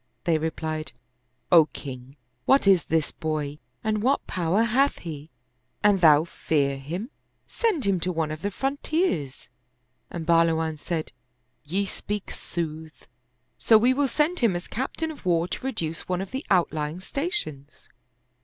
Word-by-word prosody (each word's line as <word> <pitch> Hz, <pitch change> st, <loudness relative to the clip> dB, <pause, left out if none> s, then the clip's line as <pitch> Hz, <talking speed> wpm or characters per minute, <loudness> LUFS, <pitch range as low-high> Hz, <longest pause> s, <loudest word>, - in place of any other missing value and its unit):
They 165 Hz, -2 st, +2 dB
replied, 155 Hz, 0 st, -3 dB, 0.3 s
" 125 Hz, +1 st, -45 dB
O 165 Hz, -3 st, +8 dB
king, 130 Hz, -1 st, -9 dB, 0.3 s
what 270 Hz, -3 st, +4 dB
is 190 Hz, -5 st, +5 dB
this 160 Hz, -1 st, 0 dB
boy, 150 Hz, -2 st, -3 dB, 0.2 s
and 215 Hz, -1 st, 0 dB
what 265 Hz, +5 st, +1 dB
power 180 Hz, +4 st, +1 dB
hath 265 Hz, +5 st, +2 dB
he? 155 Hz, -2 st, -8 dB, 0.5 s
An 205 Hz, -1 st, +5 dB
thou 155 Hz, -3 st, +7 dB
fear 140 Hz, -4 st, 0 dB
him, 175 Hz, -, -5 dB, 0.3 s
send 420 Hz, -, 0 dB
him 195 Hz, -2 st, +2 dB
to 180 Hz, +2 st, -1 dB
one 160 Hz, -3 st, -1 dB
of 155 Hz, 0 st, -6 dB
the 200 Hz, -, -1 dB
frontiers." 270 Hz, -, -1 dB, 0.6 s
And 170 Hz, -2 st, -5 dB
Bahluwan 165 Hz, -2 st, +2 dB
said, 165 Hz, 0 st, -3 dB, 0.3 s
" 125 Hz, +1 st, -47 dB
Ye 200 Hz, +1 st, +2 dB
speak 205 Hz, +1 st, -5 dB
sooth; 160 Hz, -2 st, -6 dB, 0.5 s
so 225 Hz, -, +6 dB
we 245 Hz, +4 st, +4 dB
will 280 Hz, +1 st, +2 dB
send 305 Hz, +7 st, +1 dB
him 230 Hz, -7 st, +3 dB
as 175 Hz, -, -4 dB
captain 295 Hz, +6 st, -3 dB
of 305 Hz, -, -12 dB
war 170 Hz, -1 st, +2 dB
to 180 Hz, -, -5 dB
reduce 170 Hz, -13 st, -3 dB
one 180 Hz, -1 st, 0 dB
of 190 Hz, 0 st, -5 dB
the 265 Hz, +3 st, -3 dB
outlying 160 Hz, -3 st, +1 dB
stations." 185 Hz, -, -4 dB
170 Hz, 155 wpm, -26 LUFS, 155-220 Hz, 0.6 s, O